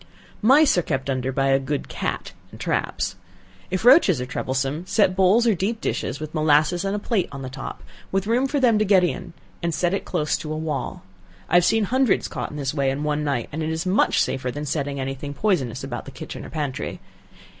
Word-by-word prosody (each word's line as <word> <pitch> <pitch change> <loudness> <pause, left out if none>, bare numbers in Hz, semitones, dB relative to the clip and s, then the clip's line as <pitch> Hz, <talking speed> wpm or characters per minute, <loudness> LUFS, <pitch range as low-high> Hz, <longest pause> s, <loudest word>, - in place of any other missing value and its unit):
Mice 265 - +5
are - - +2
kept 135 -3 -2
under 130 0 -1
by 135 +1 +1
a 135 0 +4
good 140 +1 -3
cat, - - -4 0.2
and - - -13
traps. 95 - -2 0.5
If 185 +4 -2
roaches 245 - +6
are 125 - -2
troublesome, 135 +6 -2
set 200 -2 +3
bowls 195 +5 +4
or 230 - +4
deep 205 +5 -1
dishes, 130 - -2
with 155 0 -6
molasses 155 +3 +3
and 195 +1 -1
a - - 0
plate 205 -2 -1
on 135 -1 -7
the 130 - -6
top, 135 0 -7 0.3
with 195 0 0
room 240 +5 +2
for 285 +1 0
them 235 -5 +4
to - - +3
get 195 -3 +4
in, 175 - -2 0.3
and 170 -2 -1
set 175 0 +1
it 195 - -1
close 155 -4 -1
to 155 - -6
a 155 - -2
wall. 150 -9 -4 0.5
I - - -6
have 175 0 +6
seen 225 +3 +3
hundreds 255 +2 +2
caught - - -4
in 150 - -8
this 135 -2 -2
way 140 -3 +1
in 135 +2 -2
one 150 0 0
night, 140 -6 -1
and 155 - -4
it 155 - -1
is 160 +2 -2
much 185 +3 +3
safer 130 -1 0
than 145 +4 -4
setting 140 -1 -2
any 135 0 -2
thing 145 +1 -7
poisonous 140 - 0
about - - -5
the - - -8
kitchen - - -8
or - - -9
pantry. 145 -4 -4
155 Hz, 230 wpm, -23 LUFS, 135-195 Hz, 0.5 s, roaches